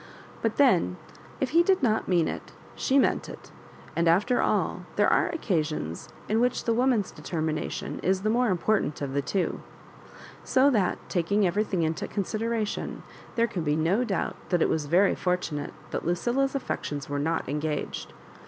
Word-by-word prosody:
But 225 -1 0
then 180 - +4 0.4
if 265 - -1
he 335 +2 +6
did 370 -2 +2
not 220 -3 +2
mean 175 -3 +3
it - - -6 0.2
she 270 - +1
meant 275 - +2
it; - - -11 0.4
and, 170 0 +2
ailer 210 +10 +3
all, - - 0
ther^ - - +5
afo 345 -2 +2
occasion^ 155 - -2 0.2
\b - - -2
whi^h 240 +3 +2
the 230 - +2
woman's 240 -4 +2
determination 155 -2 -3
is 190 +1 +1
tLe 215 +2 +1
more 245 +1 +2
important 185 -3 +1
of. 135 -1 -3
the 140 - +1
twa 185 +6 -1 0.8
So 265 +2 +4
that, 205 -7 +1
taking 195 +4 +1
everything 185 -1 0
into 160 0 -1
con 200 - -2
sideration, 220 +1 -2 0.3
there 230 -1 +3
can 195 -6 -3
be 150 -1 +1
no 170 +9 +2
doubt 195 -7 -2
that 175 -3 +3
it - - +2
was 155 -2 0
very 185 +6 +4
fortunate 175 -5 -2 0.2
that - - -2
Lucilla's 245 - 0
affections 145 - -3
were 145 0 -2
not 160 +3 -1
engaged. 150 +2 -3
190 Hz, 170 wpm, -27 LUFS, 160-235 Hz, 0.8 s, he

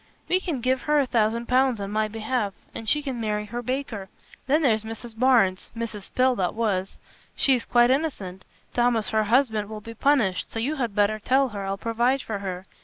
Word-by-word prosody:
"You 370 +1 +2
can 320 -10 -3
give 255 +1 +1
her 300 - +4
a 285 - +3
thousand 230 -1 +1
pounds 255 -2 +2
on 200 0 -4
my 215 0 +1
behalf, 215 -1 -2 0.2
and 225 - -3
she 300 0 +2
can 260 -4 -4
marry 210 -1 -1
her 235 +3 -5
baker. 245 -6 -4 0.4
Then 300 +4 +3
there's 220 -5 +3
Mrs. 225 +1 -8
Barnes 225 -6 +3
Mrs. 220 -4 -6
Pill 255 0 +3
that 185 0 -1
was. 200 -4 -1 0.4
She 275 - +4
is 245 - 0
quite 240 0 +4
innocent. 205 - -2 0.3
Thomas 240 -3 +2
her 220 -1 +1
husband 220 -3 +2
will 215 -1 -6
be 230 +2 -9
punished, 225 -8 +1
so - - -7
you 275 +7 -1
had 235 -6 -2
better 210 +1 +2
tell 265 +4 +2
her, 200 -3 -5
I'll 195 0 -2
provide 235 +5 0
for 215 -3 -4
her. 185 -1 -5
230 Hz, 205 wpm, -25 LUFS, 210-255 Hz, 0.4 s, her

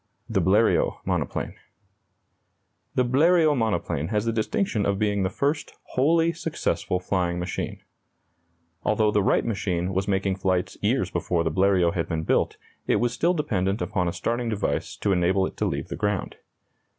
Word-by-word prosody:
THE - - +1
BLERIOT 105 +4 +3
MONOPLANE. - - -2 1.4
The 125 - +3
Bleriot 155 +4 +4
monoplane 105 - -1
has 105 +2 -1
the 115 - 0
distinction 110 - 0
of 100 0 +1
being 105 -1 +1
the 95 - +1
first 145 +8 -2
wholly 165 +5 +2
successful 165 - -2
flying 90 -2 -1
machine. 90 +1 -4 1.0
Although 110 0 +2
the 105 - +2
Wright - - +2
machine 95 -5 -1
was 95 +1 -1
making 95 -1 0
flights 95 -2 0
years - - +1
before 85 -2 0
the 80 - 0
Bleriot 95 -1 +3
had 85 - -2
been 80 -1 -1
built, - - +1 0.3
it - - +3
was 120 0 +1
still 170 +7 +1
dependent 100 - 0
upon 90 -6 -1
a - - 0
starting 120 +5 -2
device 105 -2 -2
to 100 - -1
enable 95 +1 +2
it - - -6
to - - 0
leave - - -3
the - - -4
ground. 105 0 -2
100 Hz, 160 wpm, -25 LUFS, 95-120 Hz, 1.4 s, Bleriot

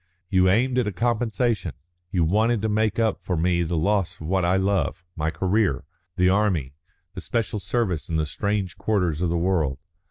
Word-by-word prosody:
You 95 -1 +4
aimed 125 +6 +2
at 120 - 0
a - - 0
compensation; 115 - 0 0.4
you 90 -2 +1
wanted 110 +6 +2
to - - +2
make 110 -1 +1
up 110 -3 0
to 90 - -1
me 85 +1 +1
for 85 - -1
the 85 0 -1
loss 100 +3 0
of 80 - -8
what 95 +3 +1
I 90 +2 +2
love 95 -4 0
my 80 0 -1
career, 95 -1 0 0.3
the 90 0 +3
army, 95 -9 +1 0.4
the - - -6
special 115 -2 -2
service 95 -4 -1
in 80 - -2
the 80 -1 +1
strange 100 +3 -2
quarters 90 -7 0
of 90 - +1
the 85 - 0
world. 85 -6 0
95 Hz, 195 wpm, -24 LUFS, 85-110 Hz, 0.4 s, You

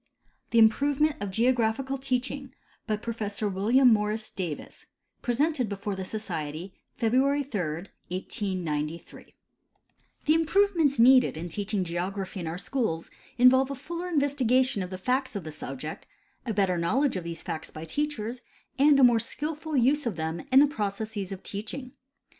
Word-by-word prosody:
THE 230 - +1
IMPROVEMENT 285 +7 +4
OF 205 - -2
GEOGRAPHICAL 245 +4 +1
TEACHING 265 +1 -3 0.3
BY 215 -2 0
PROFESSOR 215 -2 -3
WILLIAM 230 +6 +4
MORRIS 215 +1 -1
DAVIS 170 -6 -6 0.3
{Presented 260 0 +1
before 200 0 -3
(he 190 - -4
Society 180 -4 -5 0.2
February 265 +5 +2
3, 230 -8 -3 0.5
1893) 170 -4 -4 0.9
The 305 - +5
improvements 325 -2 +3
needed 250 -5 +6
in 170 +2 -5
teaching 200 +1 -1
geography 185 +3 -3
in 170 - -4
our 165 +2 -3
schools 190 -6 -2 0.3
involve 260 +2 +6
a 275 - -3
fuller 340 +6 -5
investigation 260 - +2
of 180 - -4
the 185 - -5
facts 255 +5 -1
of 200 - -3
the 155 - -6
subject, 150 0 -7 0.4
a - - 0
better 190 -3 +2
knowledge 260 +11 +1
of 185 - -3
these 170 -1 -6
facts 160 - -4
by 155 +1 -8
teachers, 245 - -3 0.4
and 285 0 +6
a - - +6
more 240 -2 +6
skilful 305 +4 -3
use 270 +3 +3
of 215 - -2
them 160 +1 -3
in 265 +1 +8
the - - +7
processes 210 -5 -3
of 195 -1 -7
teaching. 230 +6 -6
225 Hz, 150 wpm, -27 LUFS, 190-270 Hz, 0.9 s, in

